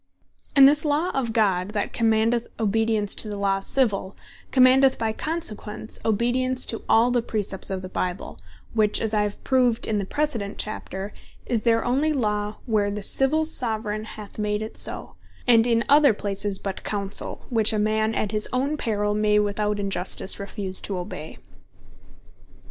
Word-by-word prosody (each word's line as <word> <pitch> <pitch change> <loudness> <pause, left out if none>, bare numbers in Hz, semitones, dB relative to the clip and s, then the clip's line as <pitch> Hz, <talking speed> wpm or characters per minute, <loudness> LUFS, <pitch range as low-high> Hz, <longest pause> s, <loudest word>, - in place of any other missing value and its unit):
And 275 -1 +9
this 295 +1 +3
Law 305 +4 0
of 255 -4 -2
God, 200 -3 +1
that 205 - -2
commandeth 225 +1 +1
Obedience 220 -1 +1
to 215 - -4
the 205 - -5
Law 195 -1 0
Civill, 200 -3 0 0.3
commandeth 260 +1 +5
by 225 -1 -1
consequence 220 -9 -3
Obedience 250 +4 0
to 225 - -4
all 235 +2 +4
the 245 -1 +2
Precepts 205 -4 -3
of 190 -1 -4
the - - -5
Bible, 185 0 -4 0.3
which 215 -2 +2
(as 220 -1 -2
I 210 - +2
have 205 -1 -4
proved 250 -3 +2
in 215 -1 -1
the 200 - -3
precedent 235 -6 -2
Chapter) 200 -1 -4 0.3
is 235 -3 -1
there 230 -1 +2
onely 285 +5 +1
Law, 210 -5 -1
where 210 -3 +1
the 205 0 -4
Civill 295 +8 +2
Soveraign 220 -7 -1
hath 215 -1 -10
made 210 0 -1
it 220 - -8
so; - - -2 0.3
and 235 -1 +5
in 230 -1 +2
other 285 -5 +5
places 200 -1 -1
but 195 -1 -6
Counsell; 200 -1 -1
which 225 -2 +4
a 215 - -1
man 215 +1 0
at 205 - -1
his 215 -1 +1
own 275 +4 -1
perill, 210 -5 -1
may 210 0 +2
without 210 0 0
injustice 195 0 +1
refuse 200 -1 -1
to 195 - -4
obey. 180 -3 -7
215 Hz, 165 wpm, -24 LUFS, 205-245 Hz, 0.3 s, And